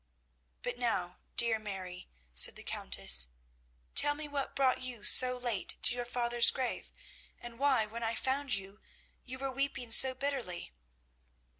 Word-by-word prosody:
"But - - -6
now, 185 -7 -3 0.2
dear 230 -2 +3
Mary," 190 -4 -9 0.2
said 60 - +4
the - - -11
Countess, 60 -1 +4 0.7
"tell 290 - +4
me 300 0 -8
what 285 -2 -6
brought 265 -2 0
you 245 -4 -8
so 250 +3 +5
late 240 -5 -3
to - - +5
your 245 -1 -6
father's 240 -1 +3
grave, 255 -2 -5 0.5
and 240 0 -11
why, 270 -5 +1
when 225 +2 -9
I 225 0 -3
found 270 +3 -2
you, 195 +1 -8 0.5
you 255 0 -8
were 270 0 -5
weeping 265 -3 -4
so 260 +2 +7
bitterly." 260 - -5
240 Hz, 150 wpm, -30 LUFS, 215-265 Hz, 0.7 s, so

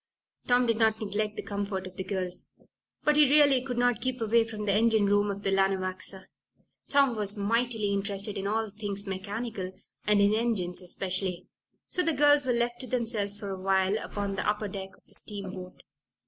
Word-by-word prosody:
Tom 245 0 +4
did 230 -2 +1
not 220 -1 +3
neglect 210 0 -1
the - - -4
comfort 200 -2 -3
of 185 0 -9
the 190 - -3
girls, 185 -1 -4 0.6
but 300 0 +3
he 300 -3 +7
really 285 -3 +6
could 250 -2 -5
not 245 -1 +2
keep 255 -1 -1
away 230 +1 +3
from 215 -2 -6
the 200 - +2
engine 220 0 +3
room 205 +1 +3
of 200 0 -4
the 195 - +1
Lanawaxa. 190 0 0 0.7
Tom 275 -4 +4
was 210 -1 -1
mightily 220 0 0
interested 200 +1 -2
in 195 0 -3
all 220 0 -1
things 205 -1 -4
mechanical, 200 0 -4 0.4
and 210 -1 +4
in 200 +1 +4
engines 215 -6 0
especially. 185 0 -2 0.4
So 365 - 0
the 330 -2 +1
girls 290 0 +4
were - - +3
left 240 0 0
to 255 - -5
themselves 220 -4 -2
for 205 -1 -6
a 190 -1 -6
while 190 +1 +2
upon 200 -1 -4
the 195 - -1
upper 210 0 -1
deck 190 -1 -7
of - - -30
the - - -13
steamboat. 190 -3 -6
205 Hz, 190 wpm, -28 LUFS, 195-230 Hz, 0.7 s, he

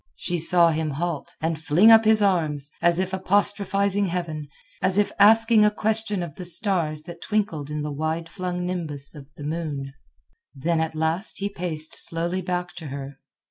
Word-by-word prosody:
She 175 - -2
saw 170 +1 +4
him 160 0 -1
halt, 155 +1 -4
and 160 0 -1
fling 175 +9 +5
up 225 0 +7
his 215 -1 +4
arms, 155 -7 0
as 170 0 +3
if 185 0 -2
apostrophizing 200 +1 +1
Heaven, 165 -4 -4 0.3
as 185 +1 +2
if 205 - +2
asking 225 +1 +6
a 210 - +5
question 210 -2 -1
of 165 -4 -7
the 185 - -6
stars 170 -4 +2
that 170 0 -10
twinkled 195 -9 -2
in 150 0 -3
the 150 - -4
wide 160 +3 -3
flung 180 0 -4
nimbus 155 -6 -4
of 145 -3 -12
the 145 - -8
moon. 145 -3 -4 0.6
Then 160 +5 0
at 160 0 -2
last 160 +6 -1
he 200 +1 -2
paced 165 -5 -2
slowly 170 +3 0
back 180 0 -3
to 160 -3 -7
her. 140 0 -7
170 Hz, 180 wpm, -24 LUFS, 155-195 Hz, 0.6 s, up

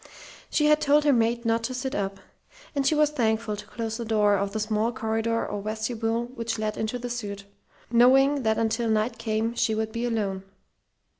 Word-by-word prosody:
She 300 - +2
had 300 0 +4
told 295 0 +4
her 290 -1 +4
maid 235 0 +1
not 230 0 +2
to 255 +1 -3
sit 260 +1 -3
up; 195 -1 -3 0.5
and 280 -2 0
she 310 - +3
was 300 0 +3
thankful 220 -5 0
to 205 0 -10
close 225 0 -4
the 235 - -4
door 210 -2 +3
of 200 0 -1
the 220 - -3
small 215 +1 0
corridor 225 -1 -1
or 205 - -4
vestibule 225 +2 -2
which 230 -2 -3
led 215 -1 -2
into 220 +3 -2
the 245 0 -5
suite, 205 -5 -5 0.5
knowing 270 +4 +5
that 220 -2 +1
until 225 +1 0
Knight 220 +2 0
came 225 0 -1
she 225 -2 +1
would 220 0 -2
be 230 +1 -3
alone. 205 -5 -1
225 Hz, 200 wpm, -26 LUFS, 215-245 Hz, 0.5 s, knowing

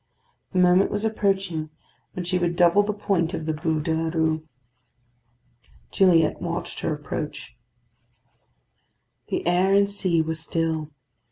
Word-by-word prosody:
The 185 - -3
moment 180 +1 +4
was 205 +1 -2
approaching 195 -7 -1 0.4
when 180 - -5
she 180 +1 0
would 175 -1 0
double 175 +3 +5
the 205 +1 -1
point 195 -4 -1
of 160 - -5
the 160 - -1
Bû 155 0 -1
de 165 0 0
la 160 0 -1
Rue. 160 -1 0 1.4
Gilliatt 170 -5 +3
watched 170 0 -4
her - - -2
approach. 150 -2 -5 1.7
The - - -3
air 180 +3 +3
and 200 0 +4
sea 185 -5 +1
were 160 0 -2
still. 160 -1 -2
170 Hz, 140 wpm, -24 LUFS, 160-190 Hz, 1.7 s, double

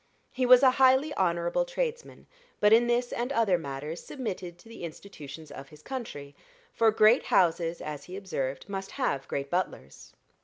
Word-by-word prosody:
He 255 -1 -1
was 250 +1 +8
a 260 - +7
highly 265 +3 +5
honorable 170 - 0
tradesman, - - -4 0.3
but 210 +1 +5
in 235 +1 +5
this 240 +1 0
and 245 +3 -2
in - - -2
other 200 -6 +3
matters 145 +2 -6
submitted 185 -10 -6
to 175 - -19
the 230 -5 -11
institutions 155 -3 -9
of 140 -1 -10
his 150 -1 -16
country; 180 - -7 0.4
for 225 - +4
great 220 +3 +4
houses, 170 -1 +1
as 150 -2 -6
he 185 +1 -8
observed, 140 -9 -4
must 195 -1 -5
have 135 -1 -1
great 140 0 -4
butlers. 185 +1 -4
190 Hz, 170 wpm, -28 LUFS, 155-245 Hz, 0.4 s, was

